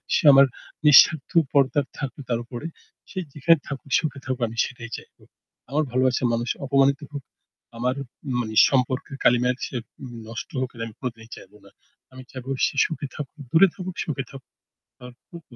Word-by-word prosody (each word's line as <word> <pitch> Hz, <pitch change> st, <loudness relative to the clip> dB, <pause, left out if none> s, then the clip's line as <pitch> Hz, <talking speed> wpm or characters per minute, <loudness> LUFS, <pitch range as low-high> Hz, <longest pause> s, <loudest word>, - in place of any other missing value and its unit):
সে -, -, +1 dB
আমার 135 Hz, 0 st, +8 dB, 0.4 s
নিঃস্বার্থ 150 Hz, 0 st, +7 dB, 0.2 s
পর্দার 140 Hz, +1 st, +3 dB
থাকুক 140 Hz, 0 st, -5 dB
তার 120 Hz, -2 st, 0 dB
উপরে। 120 Hz, +5 st, -7 dB, 0.4 s
সে 190 Hz, -, -6 dB
যেখানে 160 Hz, +3 st, +4 dB
থাকুক 140 Hz, 0 st, -7 dB
সুখে 150 Hz, -3 st, -3 dB
থাকুক 130 Hz, -1 st, -3 dB
আমি 115 Hz, -, -10 dB
সেটাই 115 Hz, -2 st, -8 dB
চাইবো। -, -, -16 dB, 0.5 s
আমার 150 Hz, +3 st, +1 dB
ভালোবাসার 130 Hz, 0 st, +2 dB
মানুষ 120 Hz, +1 st, -2 dB, 0.2 s
অপমানিত 140 Hz, +1 st, +3 dB
হোক, 145 Hz, -1 st, -6 dB, 0.5 s
আমার 125 Hz, +2 st, 0 dB, 0.5 s
মানে 110 Hz, -2 st, -4 dB
সম্পর্কের 130 Hz, 0 st, -1 dB
কালিমায় 125 Hz, +1 st, +3 dB
সে -, -, -6 dB, 0.5 s
নষ্ট 115 Hz, -3 st, -7 dB
হোক 130 Hz, -, -1 dB
এটা 115 Hz, -1 st, -5 dB
আমি 110 Hz, -, -10 dB
কোনোদিনই 115 Hz, -3 st, -6 dB
চাইবো 105 Hz, -, -15 dB
না। 100 Hz, -, -17 dB, 0.4 s
আমি 130 Hz, 0 st, -10 dB
চাইবো 130 Hz, 0 st, -9 dB, 0.2 s
সে -, -, -4 dB
সুখে 155 Hz, -3 st, -5 dB
থাকুক। 150 Hz, +1 st, -7 dB
দূরে 170 Hz, +7 st, +6 dB
থাকুক, 185 Hz, -2 st, -6 dB
সুখে 140 Hz, -4 st, -3 dB
থাকুক। 135 Hz, -2 st, -13 dB, 0.5 s
আ -, -, -8 dB, 0.2 s
খুব 170 Hz, -1 st, -11 dB
130 Hz, 165 wpm, -24 LUFS, 125-145 Hz, 0.5 s, আমার